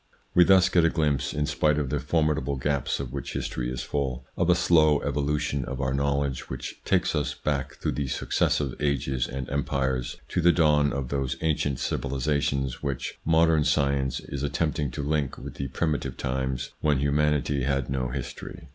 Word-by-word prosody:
We 90 - +7
thus 95 -1 +6
get 85 - +3
a 85 - +5
glimpse, 75 -4 0
in 75 0 -1
spite 75 0 +1
of 70 -3 -1
the 75 - 0
formidable 75 -1 0
gaps 70 0 -1
of 65 -2 -5
which 70 - -5
history - - -3
is 65 -1 -4
full, 65 -3 -2
of - - +1
a - - +6
slow 75 -3 +4
evolution 75 -1 -1
of 65 +1 -5
our 65 -1 0
knowlege 70 -1 -1
which 65 -1 -6
takes - - +1
us - - -1
back 70 -3 -2
through - - -2
the 70 -2 -2
successive 65 +1 0
ages 65 -3 0
and 65 0 -5
empires 65 -2 -1
to 90 - 0
the 85 +1 +6
dawn 75 -4 +3
of 65 -1 -3
those 70 -2 -1
ancient 75 -4 0
civilisations, 70 -1 -1
which 70 -4 -4
modern 80 -1 +4
science 70 -3 +1
is 70 - -6
attempting 75 0 -1
to 70 +4 -5
link 75 -2 -1
with - - -8
the 70 - -3
primitive 75 +3 -2
times 65 0 -2
when 75 -2 +2
humanity 70 0 +1
had 70 -1 0
no 65 -1 -1
history. 65 +1 -7
70 Hz, 180 wpm, -26 LUFS, 65-75 Hz, -, We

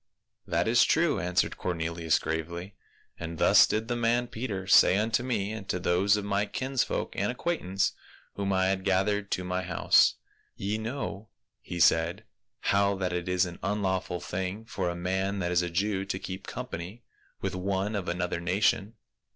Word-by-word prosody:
"That - - +1
is 115 +1 +5
true," 160 -1 +2
answered 90 0 0
Cornelius 85 -2 0
gravely. 85 +4 -4 0.5
"And 85 -1 -5
thus - - +6
did 110 +1 -1
the 120 - -1
man 120 +1 +1
Peter 110 -5 -4
say 95 0 +6
unto 110 +2 +1
me 110 -5 -1
and 110 -3 -7
to - - 0
those 95 +3 +2
of 105 - -3
my 100 +1 0
kinsfolk 130 +1 -2
and 100 +4 0
acquaintance 125 - -1 0.4
whom 100 -1 -2
I 95 0 +2
had 95 -1 -1
gathered 100 +1 +1
to 90 - -1
my 90 0 -2
house. 90 -2 +4 0.2
* - - -38
Ye 105 +2 -2
know,' 110 -3 -4 0.3
he 90 - -6
said, 85 +1 +3 0.2
' - - -57
how 100 0 +3
that 95 -2 -2
it 90 0 -2
is 90 0 +3
an 85 -1 -8
unlawful 95 -2 -1
thing 95 +4 -4
for 95 -5 -2
a 85 - -3
man 95 +3 -1
that 90 -2 -1
is 90 -1 +3
a 90 - -2
Jew 95 +2 0
to 95 -1 -3
keep 95 +1 -7
com 125 - -5
pany 100 0 -7 0.4
with - - -3
one 95 +3 -1
of 95 -3 -3
another 90 -1 -1
nation. 95 +4 +1
95 Hz, 185 wpm, -28 LUFS, 90-105 Hz, 0.5 s, thus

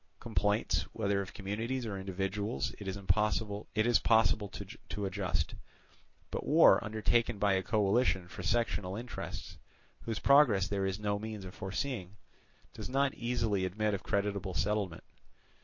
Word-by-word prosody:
Complaints, 105 -2 +1
whether 100 -2 0
of 100 0 -7
communities 115 +6 -3
or 105 -3 -3
individuals, 95 - -2
it 100 - -7
is 95 +1 -2
possible 105 +2 +1
to 110 -2 +1
adjust; 95 -5 -1 0.8
but - - -3
war - - +6
undertaken 110 +1 +1
by 100 -1 +3
a 95 - +2
coalition 100 -1 +2
for 95 - -8
sectional 95 -2 0
interests, 120 +3 -6 0.4
whose 115 -2 -3
progress 125 -10 +5
there 100 -1 0
is 95 +1 -2
no 105 -1 -1
means 110 -2 -6
of 90 - -8
foreseeing, 100 -1 -4 0.6
does - - -7
not 135 +1 +2
easily 115 -5 0
admit 105 +3 0
of 100 - -2
creditable 100 -2 -1
settlement. 100 -4 -1
105 Hz, 135 wpm, -32 LUFS, 95-110 Hz, 0.8 s, war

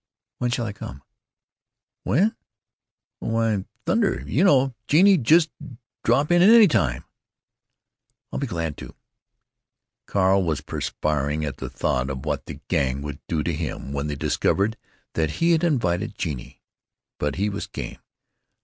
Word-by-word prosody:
"When 125 - 0
shall 120 -1 -1
I 105 - -4
come?" 70 -8 -9 1.0
"When? 200 - +2 0.9
Oh, - - -4
why, 115 -3 0 0.2
thunder!—you 195 0 +1
know, 135 -8 +4
Genie—just 165 - +5 0.5
drop 140 +7 +2
in 175 0 +5
any 220 +3 +8
time." 65 - +1 1.3
"I'll - - -2
be 140 - -2
glad 85 -6 -3
to." - - -10 1.1
Carl 95 0 +3
was 80 -6 -1
perspiring 75 0 -2
at 70 - -5
the - - -5
thought 65 +1 -1
of 65 -1 -5
what - - -2
the - - -8
Gang 65 +1 0
would 75 -1 -6
do 80 -3 -1
to 85 - -1
him 75 -3 -4
when 70 +1 -2
they 75 - -3
discovered 100 +9 +1 0.4
that 80 -2 0
he 170 +1 +2
had 165 0 +3
invited 110 - 0
Genie. 70 -9 -5 0.6
But 75 -1 -1
he 100 +3 0
was 100 -1 -4
game. - - -7
100 Hz, 140 wpm, -24 LUFS, -, 1.3 s, any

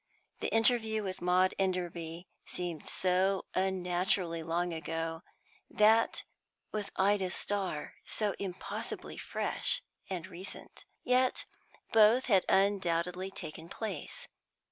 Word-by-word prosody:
The - - -1
interview 225 -2 +3
with 190 -1 -4
Maud 180 +1 +3
Enderby 175 -2 -2 0.2
seemed 175 -3 -4
so 190 +1 +2
unnaturally 180 -2 +1
long 170 +2 -1
ago; 165 0 -3 0.5
that 220 +2 +4 0.5
with 210 -2 -3
Ida 195 -1 +3
Starr, 190 -5 -2
so 210 -2 +2
impossibly 185 -2 -5
fresh - - -1 0.3
and 180 -4 -3
recent. 185 +1 -9 0.2
Yet 255 0 +3 0.5
both 225 +3 +6
had 195 -6 +4
undoubtedly 185 -2 +2
taken 160 -3 -8
place. 200 -6 -5
185 Hz, 100 wpm, -32 LUFS, 175-205 Hz, 0.5 s, both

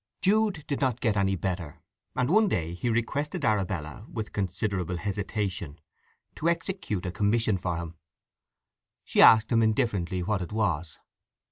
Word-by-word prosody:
Jude 205 -5 +2
did 140 - -3
not 130 -3 +1
get 110 -4 +1
any 95 -1 +2
better, 90 -4 -4 0.4
and 125 - +1
one 215 +7 +4
day 85 - -1
he 105 +7 -2
requested 140 +8 -1
Arabella, 100 -3 -1
with 110 -2 -5
considerable 95 -2 -2
hesitation, 95 -4 -3 0.6
to 165 - +1
execute 170 - -2
a 90 - -2
commission 105 +3 +1
for 90 -2 -2
him. 85 -1 -6 1.1
She - - +2
asked 110 +1 +7
him 115 -1 +4
indifferently 105 -6 0
what 100 +1 0
it 90 - -5
was. 90 -7 -1
105 Hz, 145 wpm, -27 LUFS, 90-120 Hz, 1.1 s, asked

